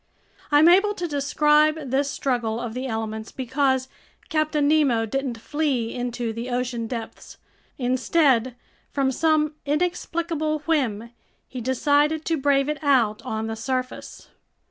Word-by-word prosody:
I'm 295 Hz, +2 st, +6 dB
able 390 Hz, +4 st, +5 dB
to 350 Hz, -2 st, -3 dB
describe 300 Hz, 0 st, +2 dB
this 275 Hz, +1 st, +1 dB
struggle 240 Hz, -5 st, -1 dB
of 235 Hz, -2 st, -5 dB
the 255 Hz, +2 st, -4 dB
elements 220 Hz, -1 st, -4 dB
because 265 Hz, 0 st, 0 dB, 0.4 s
Captain 310 Hz, -2 st, +1 dB
Nemo 280 Hz, -7 st, +3 dB
didn't 260 Hz, +1 st, -3 dB
flee 265 Hz, -4 st, -1 dB
into 240 Hz, -2 st, -3 dB
the 230 Hz, +3 st, -5 dB
ocean 245 Hz, -2 st, -2 dB
depths; 230 Hz, -1 st, -7 dB, 0.4 s
instead, 255 Hz, -1 st, +2 dB, 0.3 s
from 270 Hz, -2 st, 0 dB
some 305 Hz, +2 st, +2 dB
inexplicable 315 Hz, 0 st, -1 dB
whim, 235 Hz, -8 st, 0 dB, 0.4 s
he 255 Hz, -, -7 dB
decided 290 Hz, +5 st, +1 dB
to 330 Hz, -, 0 dB
brave 275 Hz, -1 st, +2 dB
it 300 Hz, 0 st, -3 dB
out 240 Hz, -7 st, +2 dB
on 220 Hz, 0 st, -3 dB
the 225 Hz, 0 st, -4 dB
surface. 255 Hz, +2 st, -5 dB
270 Hz, 130 wpm, -24 LUFS, 240-300 Hz, 0.4 s, I'm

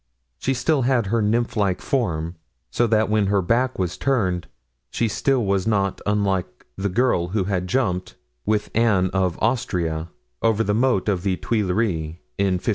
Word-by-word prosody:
She 135 Hz, -, 0 dB
had -, -, -4 dB
still 155 Hz, -1 st, +2 dB
her 115 Hz, -3 st, +1 dB
nymph 115 Hz, +3 st, +1 dB
like 100 Hz, -4 st, +1 dB
form, 85 Hz, -, -1 dB, 0.4 s
so 120 Hz, -, +2 dB
that 110 Hz, -1 st, +3 dB
when 105 Hz, -2 st, +2 dB
her 100 Hz, -1 st, +2 dB
back 125 Hz, +7 st, +1 dB
was 90 Hz, -2 st, -2 dB
turned 95 Hz, -10 st, 0 dB, 0.4 s
she 115 Hz, -, 0 dB
still 125 Hz, +2 st, +1 dB
was 95 Hz, 0 st, 0 dB
not 100 Hz, -3 st, 0 dB
unlike 100 Hz, -3 st, -1 dB
the 100 Hz, +1 st, -2 dB
girl 100 Hz, -4 st, +2 dB
who 100 Hz, +2 st, 0 dB
had 90 Hz, -1 st, -1 dB
jumped, 95 Hz, -6 st, -1 dB, 0.3 s
with 105 Hz, 0 st, 0 dB
Anne 105 Hz, -5 st, +3 dB
of 95 Hz, -2 st, +1 dB
Austria, 90 Hz, -9 st, 0 dB, 0.3 s
over 115 Hz, -1 st, +2 dB
the 105 Hz, -, 0 dB
moat 120 Hz, -3 st, +2 dB
of 95 Hz, -4 st, +1 dB
the 95 Hz, -1 st, 0 dB
Tuileries 95 Hz, -7 st, -1 dB, 0.2 s
in 100 Hz, -2 st, +2 dB
1563. 90 Hz, +5 st, -3 dB
100 Hz, 170 wpm, -23 LUFS, 90-115 Hz, 0.4 s, that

